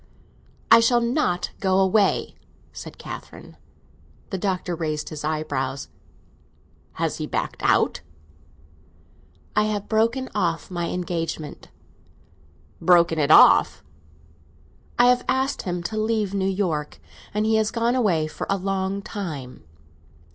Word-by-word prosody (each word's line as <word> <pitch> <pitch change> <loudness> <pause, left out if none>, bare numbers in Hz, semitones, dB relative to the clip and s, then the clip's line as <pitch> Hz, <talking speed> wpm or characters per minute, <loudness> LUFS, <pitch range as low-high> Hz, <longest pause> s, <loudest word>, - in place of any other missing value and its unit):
"I - - +10
shall 240 +1 +4
not 235 - 0
go 190 -2 +1
away!" 195 +1 +2 0.4
said - - -9
Catherine. - - -10 0.8
The 190 - -2
Doctor 185 -2 -2
raised 155 -2 -3
his 150 -1 -7
eyebrows. 140 -4 -3 1.0
"Has - - -2
he - - -3
backed - - -3
out?" - - +2 1.5
"I 210 - +3
have 210 -1 -2
broken 230 +4 +1
off 170 -5 -1
my 175 -1 -2
engagement." 165 -4 -4 1.1
"Broken 170 -2 +4
it 145 -1 +1
off?" - - +6 1.1
"I 240 - +6
have 245 0 +4
asked 265 +1 0
him 175 -1 -4
to 215 +5 -4
leave 215 -2 0
New 195 -1 0
York, 175 -7 -2 0.3
and 210 +1 -1
he 220 0 +3
has 220 -1 +1
gone 230 +1 0
away 195 -11 +2
for 155 - -6
a 195 - +2
long 195 +1 -2
time." 155 - -6
190 Hz, 125 wpm, -23 LUFS, 165-215 Hz, 1.5 s, I